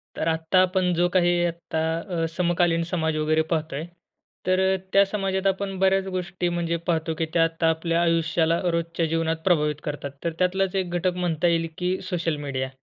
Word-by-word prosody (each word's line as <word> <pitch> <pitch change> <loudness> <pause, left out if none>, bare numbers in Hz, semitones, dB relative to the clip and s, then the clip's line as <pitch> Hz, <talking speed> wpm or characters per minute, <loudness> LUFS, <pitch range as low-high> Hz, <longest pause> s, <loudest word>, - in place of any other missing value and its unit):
तर - - -2
आता 160 +3 +2
आपण 185 -1 +2
जो 175 +1 +2
काही 175 -1 +4
आता 170 -1 -3 0.4
अ - - +2
समकालीन 175 0 +1
समाज 160 -3 0
वगैरे 155 +1 +2
पाहतोय, 155 -2 -2 0.6
तर 185 0 +3 0.3
त्या 195 - +7
समाजात 195 -1 -1
आपण 195 0 -1
बऱ्याच 190 0 +3
गोष्टी 180 0 -2
म्हणजे 170 -1 -1
पाहतो 160 -1 0
की 165 - +1
त्या 165 -1 +4
आता 165 0 +1
आपल्या 165 +1 0
आयुष्याला 165 0 +2
रोजच्या 170 0 -1
जीवनात 165 0 0
प्रभावित 150 -5 +3
करतात. 145 -1 -4
तर 170 - -1
त्यातलाच 185 +1 +1
एक 190 -2 0
घटक 180 +1 0
म्हणता 175 -2 0
येईल 165 -1 +1
की 180 +1 0
सोशल 170 -3 -1
मीडिया. 130 -1 -2
170 Hz, 175 wpm, -24 LUFS, 160-180 Hz, 0.6 s, त्या